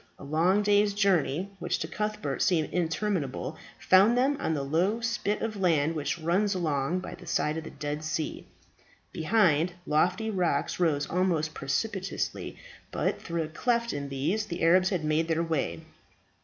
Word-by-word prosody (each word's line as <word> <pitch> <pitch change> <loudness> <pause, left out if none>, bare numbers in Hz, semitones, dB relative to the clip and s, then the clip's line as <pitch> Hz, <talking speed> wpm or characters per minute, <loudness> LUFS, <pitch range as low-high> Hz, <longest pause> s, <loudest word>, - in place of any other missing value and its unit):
A - - -12
long 170 +8 +2
day's 205 0 +3
journeying, 190 -2 +1
which - - -1
to 160 - -4
Cuthbert 210 +4 -3
seemed 165 -6 +2
interminable, 165 -5 -1 0.2
found 200 +6 +5
them 270 +3 +3
on 160 -11 0
the 140 - -2
low 175 +10 +1
spit 225 -2 -1
of 225 -1 -2
sand 160 -3 +2
which 145 0 -2
runs 185 +5 +1
along 160 0 0
by - - -7
the - - -12
side 150 - 0
of 160 - -4
the - - -6
Dead 145 +1 -5
Sea. 155 0 -3 0.6
Behind, 170 -2 +2
lofty 180 +8 +1
rocks 175 -7 0
rose 155 -5 +1
almost 170 -4 0
precipitously, 190 +8 -3 0.3
but - - -1
through 170 -1 -2
a - - -5
cleft 235 +8 0
in 140 -1 -4
these 160 +11 -1
the 170 0 -4
Arabs 185 +3 +5
had 180 -6 -2
made 155 +2 +1
their 165 0 +1
way. 145 - -2
170 Hz, 165 wpm, -28 LUFS, 155-200 Hz, 0.6 s, found